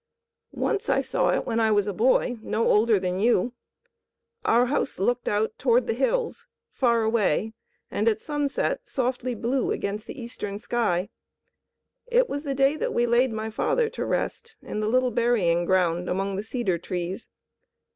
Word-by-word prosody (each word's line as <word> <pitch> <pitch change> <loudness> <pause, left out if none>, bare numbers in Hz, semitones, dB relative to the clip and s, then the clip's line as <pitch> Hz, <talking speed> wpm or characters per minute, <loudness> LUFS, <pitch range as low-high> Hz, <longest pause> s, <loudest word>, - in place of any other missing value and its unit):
"Once 405 - -1
I - - +3
saw - - 0
it - - +1
when 230 -1 -1
I 220 -1 +3
was 205 -2 +3
a 205 - -2
boy, 240 +2 +2
no 225 +1 0
older 215 -1 +4
than 180 0 -2
you. 235 +1 +2 0.9
Our 240 +2 +4
house 275 +4 -1
looked 240 +5 0
out 215 +1 0
toward 245 -1 +3
the - - 0
hills, 450 - -1 0.2
far 235 -3 +2
away 220 -1 +1 0.4
and 215 - 0
at 220 -1 +3
sunset 295 - -2
softly 255 -1 -2
blue 245 +4 -1
against 205 +2 -3
the - - -8
eastern 210 -4 -5
sky. 205 -5 -1 1.0
It - - +3
was 285 - -3
the 280 -2 -3
day 275 +2 +3
that - - -2
we 240 - +3
laid 240 +1 +3
my 220 0 -4
father 460 - +1
to 475 - -4
rest 460 -1 -3
in - - -4
the 215 0 0
little 255 +1 +2
burying 215 -8 +2
ground 180 -1 +1
among 195 +1 -1
the 195 - -2
cedar 220 -5 -2
trees. 180 +5 -5
230 Hz, 170 wpm, -25 LUFS, 205-255 Hz, 1.0 s, older